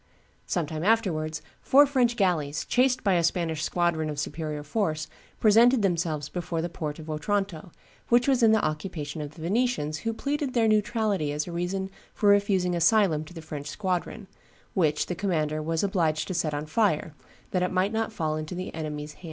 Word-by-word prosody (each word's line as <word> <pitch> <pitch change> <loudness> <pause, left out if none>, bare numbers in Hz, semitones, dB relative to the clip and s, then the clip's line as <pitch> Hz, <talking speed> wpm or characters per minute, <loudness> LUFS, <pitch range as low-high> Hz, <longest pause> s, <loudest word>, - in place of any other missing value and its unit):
Some 175 -3 0
time 155 +1 -5
afterwards, 175 -8 +1 0.2
four 285 +2 +6
French 255 -4 +2
galleys, 160 -8 0
chased 255 0 +2
by 200 -3 +3
a 170 -1 +2
Spanish 165 -2 0
squadron 160 -1 0
of 150 -1 -4
superior 150 0 -4
force, 155 -2 -1 0.3
presented 230 +2 +5
themselves 165 -5 0
before 170 -2 -4
the 170 +2 -2
port 150 -4 -4
of 160 -1 -10
Otranto, 180 +1 -2 0.4
which 240 +1 +4
was 265 -3 +3
in 225 -1 +6
the 220 -1 +3
occupation 155 -1 -4
of 145 0 -7
the 160 - -9
Venetians, 180 -6 0
who 225 - -2
pleaded 280 +3 -2
their 230 -2 +4
neutrality 215 -6 +1
as 150 +1 -2
a 175 - -7
reason 190 +3 -3 0.2
for 205 - +3
refusing 200 -3 +3
asylum 170 -2 +3
to 160 - -13
the 165 - -8
French 150 -2 -6
squadron, 185 +3 -3 0.5
which 155 -5 +1
the - - -3
commander 155 -5 -1
was 165 +2 -1
obliged 170 -6 0
to - - -1
set 170 -3 0
on 145 +1 -3
fire 155 -3 +1 0.4
that 180 - +1
it 180 - +1
might 185 +3 +1
not 225 0 -1
fall 155 -6 -2
into 155 +3 -5
he 185 +1 -5
enemy's 150 -2 -5
hands." - - -23
175 Hz, 190 wpm, -27 LUFS, 155-205 Hz, 0.5 s, four